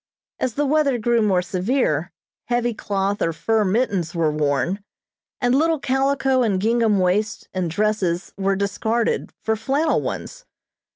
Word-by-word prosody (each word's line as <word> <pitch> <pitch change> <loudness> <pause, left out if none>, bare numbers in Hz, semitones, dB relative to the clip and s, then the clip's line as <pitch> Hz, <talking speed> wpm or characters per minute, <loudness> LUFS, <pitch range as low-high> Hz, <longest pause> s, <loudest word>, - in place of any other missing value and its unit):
As 250 -3 -1
the 290 - +1
weather 285 -2 +2
grew 235 +1 +2
more 190 -4 +2
severe, 195 +10 0 0.3
heavy 240 0 0
cloth 200 -1 -2
or 165 - +2
fur 215 +7 +1
mittens 195 -5 0
were 165 -2 +2
worn, 150 +6 0 0.6
and 245 -1 +2
little 320 +4 +3
calico 270 -1 +1
and 205 -6 +1
gingham 225 0 +2
waists 205 +4 0
and 185 -2 -1
dresses 195 -1 -1
were 195 0 0
discarded 220 +4 -1
for 220 - +1
flannel 280 +8 +1
ones. - - -5
215 Hz, 140 wpm, -22 LUFS, 185-250 Hz, 0.6 s, little